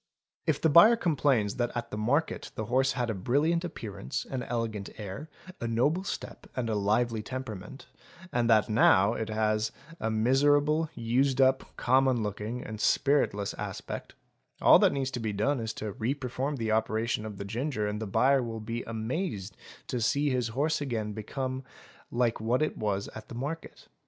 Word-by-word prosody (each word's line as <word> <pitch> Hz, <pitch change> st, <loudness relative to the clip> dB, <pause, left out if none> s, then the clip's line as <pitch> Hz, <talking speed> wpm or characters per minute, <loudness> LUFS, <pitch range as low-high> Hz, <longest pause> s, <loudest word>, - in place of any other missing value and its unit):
If -, -, +2 dB
the -, -, +3 dB
buyer 170 Hz, +10 st, +8 dB
complains 140 Hz, -, +1 dB
that 120 Hz, -1 st, 0 dB
at 120 Hz, -, -4 dB
the -, -, -3 dB
market 130 Hz, +9 st, 0 dB
the 110 Hz, -, -3 dB
horse 130 Hz, +3 st, +2 dB
had 120 Hz, -3 st, -1 dB
a -, -, -2 dB
brilliant 145 Hz, -, +1 dB
appearance, 100 Hz, -, -5 dB
an 130 Hz, -2 st, -4 dB
elegant 115 Hz, -5 st, -3 dB
air, 105 Hz, +9 st, -7 dB, 0.3 s
a 120 Hz, -, -2 dB
noble 145 Hz, +11 st, +1 dB
step, -, -, -6 dB
and 120 Hz, -3 st, -1 dB
a -, -, 0 dB
lively 110 Hz, +3 st, +1 dB
temperament, 125 Hz, 0 st, -7 dB, 0.5 s
and 120 Hz, -1 st, +1 dB
that 110 Hz, -2 st, +6 dB
it -, -, -5 dB
now 105 Hz, -1 st, +5 dB
has 110 Hz, -1 st, 0 dB, 0.3 s
a 110 Hz, -, -1 dB
miserable, 145 Hz, +7 st, +3 dB
used 125 Hz, +3 st, +1 dB
up, 130 Hz, 0 st, +2 dB
common 130 Hz, -2 st, +3 dB
looking, 105 Hz, +4 st, -4 dB
and 110 Hz, -1 st, -6 dB
spiritless 120 Hz, -8 st, +2 dB
aspect, -, -, -6 dB, 0.4 s
all -, -, +7 dB
that -, -, +5 dB
need 135 Hz, -3 st, -2 dB
be 110 Hz, -2 st, -2 dB
done 125 Hz, +7 st, +1 dB
is 110 Hz, -1 st, -2 dB
to 105 Hz, -2 st, -5 dB
reperform 135 Hz, +4 st, -2 dB
the 110 Hz, -2 st, -1 dB
operation 110 Hz, 0 st, 0 dB
of 105 Hz, -2 st, -7 dB
the 100 Hz, -, -5 dB
ginger 115 Hz, +1 st, -2 dB
and 105 Hz, +1 st, -3 dB
the 110 Hz, -, -3 dB
buyer 130 Hz, +7 st, +3 dB
will 115 Hz, -2 st, -4 dB
be 115 Hz, +2 st, -4 dB
amazed 110 Hz, -, -3 dB, 0.3 s
to 125 Hz, -, -3 dB
see 140 Hz, +5 st, +2 dB
his 125 Hz, -3 st, 0 dB
horse 145 Hz, +7 st, 0 dB
become 120 Hz, +1 st, -3 dB
again -, -, -11 dB, 0.5 s
like 120 Hz, -2 st, 0 dB
what 120 Hz, +6 st, +2 dB
it 155 Hz, -, -1 dB
was 100 Hz, -2 st, -1 dB
at 110 Hz, 0 st, -10 dB
the -, -, -8 dB
market. 145 Hz, +7 st, -6 dB
120 Hz, 175 wpm, -29 LUFS, 110-135 Hz, 0.5 s, buyer